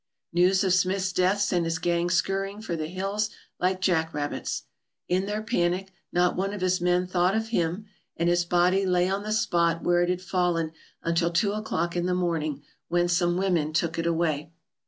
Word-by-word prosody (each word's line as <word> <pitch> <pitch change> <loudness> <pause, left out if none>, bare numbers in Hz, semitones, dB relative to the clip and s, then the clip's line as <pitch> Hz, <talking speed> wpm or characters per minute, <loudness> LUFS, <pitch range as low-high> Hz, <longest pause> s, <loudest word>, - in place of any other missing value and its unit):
News 185 +3 +4
of 190 -2 +2
Smith's 185 0 +1
death 185 +3 +2
sent 180 -4 +1
his 165 0 -1
gang 170 +1 0
scurrying 195 +3 0
for 215 -6 -4
the 155 -1 -3
hills 195 +4 -2 0.3
like 185 +1 0
jack 165 -4 +1
rabbits. 145 0 -3 0.4
In 185 +2 0
their 210 +1 -2
panic 190 -4 0 0.2
not 175 0 +2
one 195 +2 -1
of 200 - -7
his 185 -1 +1
men 180 +1 +2
thought 180 +1 +1
of 220 0 -1
him 180 0 -1 0.3
and 170 - +1
his 175 0 +3
body 180 +2 +2
lay 180 -1 +2
on 195 +1 -1
the 215 +1 -4
spot 170 -5 +1
where 175 0 +3
it 175 - +1
had 180 0 -1
fallen 175 -4 0 0.3
until 165 0 +1
two 200 +4 +1
o'clock 195 -5 -2
in 175 0 0
the 180 - +1
morning, 155 -5 -1 0.2
when 175 0 +2
some 175 0 +1
women 175 -5 +1
took 165 0 0
it 165 - 0
away. 160 -3 0
180 Hz, 195 wpm, -26 LUFS, 170-190 Hz, 0.4 s, News